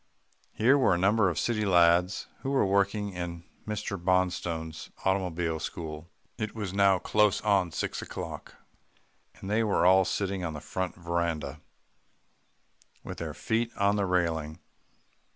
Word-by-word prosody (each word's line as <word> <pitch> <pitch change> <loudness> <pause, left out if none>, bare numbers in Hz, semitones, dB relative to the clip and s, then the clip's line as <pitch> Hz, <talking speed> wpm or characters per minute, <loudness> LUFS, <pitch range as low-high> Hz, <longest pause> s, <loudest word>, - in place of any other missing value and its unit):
Here 130 +6 +4
were 100 -8 +4
a - - 0
number 100 +2 +3
of 85 - -4
city 110 +3 0
lads 90 -1 +3
who 135 - -4
were 135 -5 +2
working 100 +1 +1
in 85 -1 -5 0.2
Mr. 105 -3 -4
Bonstone's 90 -3 -1 0.2
automobile 90 -4 0
school. 80 0 -6 0.3
It 110 -1 -3
was 105 -4 -4
now 100 -1 +4
close 105 +2 +2
on 100 -5 +2
six - - -3
o'clock, - - -7 0.8
and - - -10
they 110 +3 +2
were 105 -5 +2
all 95 +1 +6
sitting 95 0 -2
on 80 -2 -3
the - - -5
front 90 +4 -4
veranda, 85 -4 -2 1.4
with - - -7
their - - -5
feet 115 +1 0
on 100 0 +3
the 100 -2 0
railing. 80 -4 0
95 Hz, 145 wpm, -28 LUFS, 85-100 Hz, 1.4 s, all